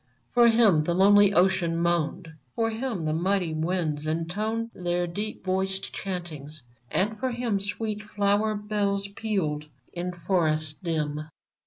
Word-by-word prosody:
For 240 Hz, -1 st, +6 dB
him 220 Hz, -9 st, +5 dB
the 170 Hz, -, 0 dB
lonely 205 Hz, +1 st, +6 dB
ocean 180 Hz, -3 st, +2 dB
moaned; 170 Hz, 0 st, 0 dB, 0.3 s
P'or 225 Hz, 0 st, +1 dB
him 225 Hz, -7 st, -3 dB
the 155 Hz, -, 0 dB
mighty 180 Hz, 0 st, +1 dB
winds 155 Hz, -2 st, -1 dB
intoned 210 Hz, +8 st, -2 dB
Their 175 Hz, 0 st, -1 dB
deep 205 Hz, +6 st, -5 dB
voiced 190 Hz, +1 st, -1 dB
chantings, 155 Hz, -6 st, -6 dB, 0.3 s
and 210 Hz, +3 st, 0 dB
for 260 Hz, -, 0 dB
him 235 Hz, -4 st, -1 dB
Sweet 210 Hz, +1 st, -3 dB
flower 210 Hz, 0 st, +1 dB
bells 205 Hz, -1 st, -1 dB
pealed 190 Hz, -8 st, -2 dB, 0.3 s
in 180 Hz, +1 st, -3 dB
forests 160 Hz, -4 st, 0 dB
dim. 155 Hz, -3 st, -2 dB
190 Hz, 135 wpm, -27 LUFS, 165-210 Hz, 0.3 s, For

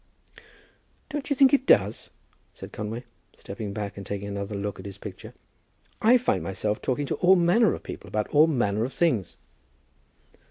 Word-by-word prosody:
"Don't 295 Hz, -1 st, -4 dB
you 285 Hz, -, +1 dB
think 270 Hz, +1 st, +5 dB
it 270 Hz, -1 st, +2 dB
does?" 105 Hz, +2 st, +3 dB, 0.5 s
said -, -, -10 dB
Conway, 110 Hz, +3 st, -5 dB, 0.3 s
stepping 100 Hz, +1 st, -7 dB
back 100 Hz, -1 st, -5 dB
and 100 Hz, -, -6 dB
taking 100 Hz, +1 st, -5 dB
another 100 Hz, +1 st, -4 dB
look 100 Hz, -1 st, -4 dB
at 95 Hz, -, -10 dB
his 100 Hz, 0 st, -9 dB
picture. -, -, -10 dB, 0.7 s
"I 235 Hz, +3 st, +6 dB
find 250 Hz, -, 0 dB
myself 105 Hz, +2 st, -2 dB
talking 140 Hz, +3 st, -1 dB
to -, -, -2 dB
all 185 Hz, +1 st, +5 dB
manner 180 Hz, +4 st, +3 dB
of -, -, -11 dB
people -, -, -8 dB
about 105 Hz, +2 st, -2 dB
all 155 Hz, +2 st, +5 dB
manner 110 Hz, -8 st, 0 dB
of 130 Hz, -, -4 dB
things." 125 Hz, -, 0 dB
110 Hz, 170 wpm, -26 LUFS, -, 0.7 s, I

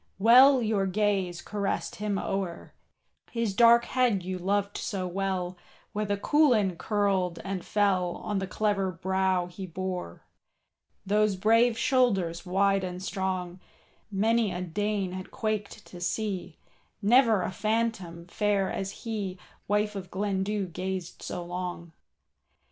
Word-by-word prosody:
Well 250 Hz, +5 st, +7 dB
your 210 Hz, -3 st, +1 dB
gaze 190 Hz, -3 st, 0 dB
caressed 200 Hz, -1 st, -3 dB
him 205 Hz, -1 st, -1 dB
o'er, 195 Hz, -4 st, -4 dB, 0.6 s
His 230 Hz, -4 st, -1 dB
dark 235 Hz, +2 st, +6 dB
head 245 Hz, -7 st, +1 dB
you 185 Hz, 0 st, -4 dB
loved 200 Hz, +2 st, 0 dB
so 190 Hz, -3 st, -3 dB
well, 185 Hz, -1 st, -2 dB, 0.4 s
Where 210 Hz, +1 st, -1 dB
the 200 Hz, 0 st, 0 dB
coulin 230 Hz, -, +3 dB
curled 195 Hz, -4 st, 0 dB
and 195 Hz, -2 st, -4 dB
fell 190 Hz, -4 st, +1 dB
On 205 Hz, -2 st, -3 dB
the 190 Hz, -, -3 dB
clever 195 Hz, -1 st, 0 dB
brow 190 Hz, +1 st, 0 dB
he 180 Hz, +2 st, -8 dB
bore. 180 Hz, -, -5 dB, 0.8 s
Those 210 Hz, 0 st, +2 dB
brave 225 Hz, +4 st, +3 dB
shoulders 195 Hz, -12 st, +1 dB
wide 195 Hz, +1 st, +2 dB
and 180 Hz, -1 st, -4 dB
strong, 185 Hz, -2 st, -3 dB, 0.5 s
Many 220 Hz, +1 st, +2 dB
a 180 Hz, 0 st, -4 dB
Dane 200 Hz, +2 st, -1 dB
had 185 Hz, 0 st, -7 dB
quaked 215 Hz, -1 st, -3 dB
to 175 Hz, -, -11 dB
see, 190 Hz, -3 st, -3 dB, 0.5 s
Never 225 Hz, -3 st, +5 dB
a -, -, -2 dB
phantom 210 Hz, -5 st, -2 dB
fair 200 Hz, +1 st, 0 dB
as 195 Hz, +1 st, -5 dB
he,— 205 Hz, -5 st, -3 dB, 0.3 s
Wife 210 Hz, +1 st, +1 dB
of 190 Hz, -2 st, -6 dB
Glendu 200 Hz, +1 st, -1 dB
gazed 185 Hz, -1 st, -4 dB
so 175 Hz, -1 st, -5 dB
long. 175 Hz, -1 st, -5 dB
195 Hz, 130 wpm, -28 LUFS, 185-210 Hz, 0.8 s, Well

